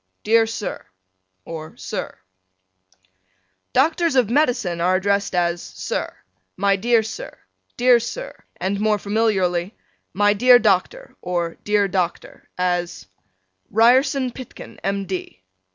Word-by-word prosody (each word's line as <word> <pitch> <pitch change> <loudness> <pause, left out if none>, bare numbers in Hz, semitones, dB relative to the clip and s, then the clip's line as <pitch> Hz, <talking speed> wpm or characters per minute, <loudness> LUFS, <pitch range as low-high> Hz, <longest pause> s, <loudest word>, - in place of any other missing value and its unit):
Dear 225 +1 +4
Sir: 220 -2 -5 0.6
or 160 -1 -8
Sir: - - -5 1.5
Doctors 320 +3 +2
of 245 -4 +3
Medicine 245 - +1
are 180 +2 +3
addressed 200 0 0
as 175 -1 +1
Sir: - - -4 0.5
My 200 +1 +3
dear 230 +3 +2
Sir: 365 - -7 0.4
Dear 245 0 +5
Sir: - - -6 0.2
and 195 +1 -2
more 215 0 +2
familiarly 200 -3 0 0.4
My 205 +2 +3
dear 245 +4 +7
Dr: 240 - 0
or 175 -2 -2
Dear 210 -1 +2
Dr: 180 -2 -3
as 175 -1 -1 0.6
Ryerson 255 +4 +3
Pitkin, 255 0 -11
M. 195 0 -1
D. 185 - -6
205 Hz, 115 wpm, -21 LUFS, 180-240 Hz, 1.5 s, dear